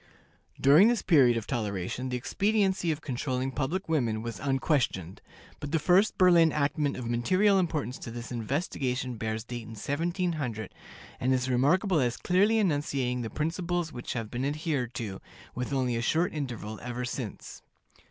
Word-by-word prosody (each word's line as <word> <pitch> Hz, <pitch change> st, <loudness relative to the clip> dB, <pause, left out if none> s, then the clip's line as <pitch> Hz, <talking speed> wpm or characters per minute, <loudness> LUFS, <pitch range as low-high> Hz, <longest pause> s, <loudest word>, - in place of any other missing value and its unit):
During 150 Hz, +10 st, +7 dB
this 240 Hz, -1 st, +1 dB
period 130 Hz, -9 st, +5 dB
of 115 Hz, -, -3 dB
toleration 105 Hz, +1 st, -3 dB
the 125 Hz, -, -1 dB
expediency 190 Hz, -, +1 dB
of 155 Hz, 0 st, -4 dB
controlling 130 Hz, -1 st, -2 dB
public 150 Hz, +9 st, -2 dB
women 120 Hz, -9 st, 0 dB
was 115 Hz, -3 st, -5 dB
unquestioned; 135 Hz, -, 0 dB, 0.4 s
but 145 Hz, -, -6 dB
the 165 Hz, -, +3 dB
first 185 Hz, +6 st, +3 dB
Berlin 175 Hz, -3 st, +6 dB
enactment 145 Hz, 0 st, 0 dB
of 125 Hz, -, -5 dB
material 185 Hz, -, +3 dB
importance 155 Hz, -8 st, -2 dB
to -, -, -7 dB
this 120 Hz, +2 st, -7 dB
investigation 125 Hz, 0 st, -2 dB
bears 110 Hz, 0 st, -3 dB
date 120 Hz, 0 st, -6 dB
in 115 Hz, 0 st, -10 dB
1700, 145 Hz, -, -2 dB, 0.5 s
and 130 Hz, -, +1 dB
is 130 Hz, 0 st, +1 dB
remarkable 165 Hz, -, +3 dB
as 120 Hz, -3 st, 0 dB
clearly 200 Hz, +5 st, +3 dB
enunciating 145 Hz, -, 0 dB
the 115 Hz, -, -4 dB
principles 165 Hz, -, -2 dB
which 120 Hz, -, -5 dB
have 115 Hz, -3 st, -4 dB
been 125 Hz, +1 st, -3 dB
adhered 145 Hz, -4 st, -2 dB
to, 100 Hz, -5 st, -5 dB, 0.3 s
with 125 Hz, +2 st, -4 dB
only 130 Hz, -3 st, 0 dB
a 115 Hz, -, -1 dB
short 160 Hz, +8 st, +1 dB
interval, 120 Hz, -7 st, -5 dB
ever 125 Hz, 0 st, -4 dB
since. 120 Hz, -3 st, -6 dB
135 Hz, 160 wpm, -28 LUFS, 120-165 Hz, 0.5 s, During